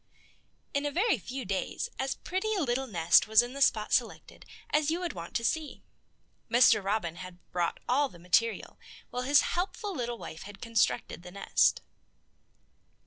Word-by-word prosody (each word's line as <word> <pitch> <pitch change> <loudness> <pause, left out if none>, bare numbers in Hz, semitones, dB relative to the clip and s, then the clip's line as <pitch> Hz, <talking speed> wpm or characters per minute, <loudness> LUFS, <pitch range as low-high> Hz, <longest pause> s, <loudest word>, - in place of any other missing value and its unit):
In 280 - 0
a - - -2
very 370 - +2
few 255 +6 -6
days 195 - -2
as 265 0 -1
pretty 405 +4 -2
a 385 - 0
little 265 0 -1
nest 170 -4 +4
was 220 +2 +6
in 245 +1 -7
the 280 - -6
spot 215 -5 +2
selected - - -2 0.2
as 300 0 +2
you 330 +2 0
would 355 -1 -3
want 170 0 -9
to 230 - 0
see. 310 +3 -2 0.7
Mr. 230 -3 +5
Robin 195 -4 -1
had 185 0 -9
brought 175 -1 -1
all 275 +3 +2
the 175 - -15
material, 180 +6 0 0.3
while 250 - -3
his 280 +3 +5
helpful 395 +3 -2
little 240 -5 -3
wife 160 -6 -9
had 205 0 -10
constructed 230 -6 0
the 180 - -10
nest. 195 +2 +2
240 Hz, 170 wpm, -29 LUFS, 195-285 Hz, 0.7 s, was